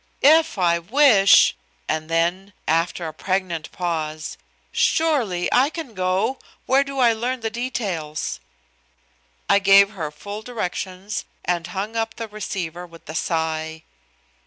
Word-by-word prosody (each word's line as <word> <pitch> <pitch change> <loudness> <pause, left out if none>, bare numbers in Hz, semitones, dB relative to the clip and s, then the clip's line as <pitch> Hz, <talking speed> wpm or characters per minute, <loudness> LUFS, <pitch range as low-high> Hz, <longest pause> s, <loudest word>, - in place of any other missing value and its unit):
"If 315 -1 +5
I 170 -2 +2
wish!" 210 - +5 0.3
and 155 0 -2
then, 175 +4 0
after 165 +1 0
a 155 - -6
pregnant 185 -2 -2
pause, 155 -3 -3 0.4
"Surely, 245 - +1
I 260 +3 +4
can 315 -7 -7
go. 185 +6 0 0.3
Where 270 +2 +4
do 275 0 -7
I 240 -3 +5
learn 245 +3 -3
the 225 0 -2
details?" 195 - -3 1.1
I 200 - +5
gave 200 0 +6
her 165 -7 -4
full 200 +8 -8
directions 200 -3 -4 0.2
and 175 -1 -1
hung 195 +5 -4
up 225 0 -2
the 230 - -5
receiver 185 -4 -5
with 165 -1 -16
a - - -5
sigh. 160 -1 -2
190 Hz, 135 wpm, -22 LUFS, 170-230 Hz, 1.1 s, gave